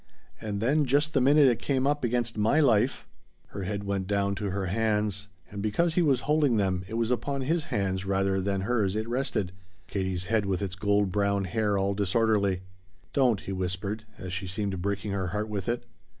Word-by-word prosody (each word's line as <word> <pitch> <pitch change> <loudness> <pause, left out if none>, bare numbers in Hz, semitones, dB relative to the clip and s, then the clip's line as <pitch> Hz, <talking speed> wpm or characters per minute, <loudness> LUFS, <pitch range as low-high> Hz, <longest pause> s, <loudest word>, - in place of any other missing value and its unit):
And 105 -2 -3
then 145 +6 +3
just 145 +4 +2
the 135 - +3
minute 140 +2 +6
it 120 -3 +2
came 135 -2 0
up 145 0 +1
against 120 -1 0
my 110 +8 +3
life 125 -3 +2 0.2
" - - -38
Her 100 -2 -5
head 100 +1 -3
went 100 -2 -2
down 100 0 +1
to 100 +1 -3
her 95 0 -2
hands, 105 0 0 0.2
and 100 -1 -5
because 160 +12 +1
he 180 - +3
was 135 -7 +3
holding 150 -5 +2
them 95 -3 0
it 110 - -6
was 115 +1 0
upon 140 +2 -1
his 160 +4 0
hands 95 -2 -1
rather 95 0 +1
than 100 0 -1
hers 105 -2 0
it 110 +1 -2
rested, 120 -7 -1 0.3
Katie's 95 -2 -2
head 105 +1 0
with 95 0 -1
its 95 -2 -3
gold 100 0 +1
brown 100 0 +1
hair 105 +1 0
all 100 +1 +1
disorderly. 100 -1 +1 0.5
"Don't," 125 -7 +3
he - - -6
whispered, 95 +3 -3
as 95 -1 -6
she 95 +1 -3
seemed 95 0 -3
breaking 100 +1 -2
her 95 -2 -1
heart 105 +4 -2
with 100 0 -3
it. 120 0 -2
105 Hz, 205 wpm, -28 LUFS, 95-120 Hz, 0.5 s, minute